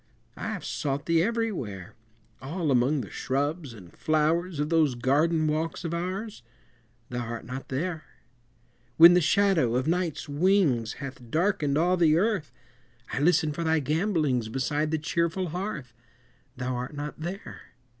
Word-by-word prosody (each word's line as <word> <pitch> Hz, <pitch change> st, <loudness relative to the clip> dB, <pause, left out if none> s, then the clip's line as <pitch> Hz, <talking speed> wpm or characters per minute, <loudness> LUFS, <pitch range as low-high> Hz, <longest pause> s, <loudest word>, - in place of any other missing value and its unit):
I -, -, -5 dB
have -, -, -6 dB
sought 140 Hz, 0 st, -2 dB
thee 165 Hz, -1 st, +3 dB
everywhere, 180 Hz, -, -2 dB, 0.5 s
All 155 Hz, +2 st, -2 dB
among 130 Hz, +3 st, +2 dB
the 105 Hz, -, -9 dB
shrubs 145 Hz, +2 st, -2 dB
and 95 Hz, -7 st, -13 dB
flowers 155 Hz, +2 st, +1 dB
Of 150 Hz, +1 st, 0 dB
those 155 Hz, -6 st, +3 dB
garden 155 Hz, +6 st, +2 dB
walks 160 Hz, +3 st, -2 dB
of 165 Hz, -, -2 dB
ours 185 Hz, -, -4 dB, 0.7 s
Thou 120 Hz, -1 st, -3 dB
art 115 Hz, 0 st, -6 dB
not 130 Hz, +2 st, -7 dB
there! 155 Hz, +4 st, -3 dB, 0.9 s
When 170 Hz, +2 st, +10 dB
the 180 Hz, -, +4 dB
shadow 175 Hz, -, +3 dB
of 130 Hz, +1 st, +1 dB
Night's 170 Hz, -2 st, -1 dB
wings 145 Hz, -, +2 dB
Hath 135 Hz, -4 st, -9 dB
darkened 155 Hz, -, +1 dB
all 180 Hz, +3 st, +3 dB
the 160 Hz, -2 st, +4 dB
Earth, 200 Hz, -5 st, 0 dB, 0.6 s
I -, -, -1 dB
listen 155 Hz, 0 st, +3 dB
for 170 Hz, -, -3 dB
thy 160 Hz, -1 st, +2 dB
gambolings 150 Hz, -, 0 dB
Beside 145 Hz, +5 st, -1 dB
the 160 Hz, -, 0 dB
cheerful 170 Hz, +3 st, -1 dB
hearth 165 Hz, -, -5 dB, 0.6 s
Thou 125 Hz, 0 st, -2 dB
art 125 Hz, +4 st, -5 dB
not 145 Hz, +1 st, -6 dB
there! 180 Hz, +5 st, -6 dB
155 Hz, 150 wpm, -27 LUFS, 135-175 Hz, 0.9 s, When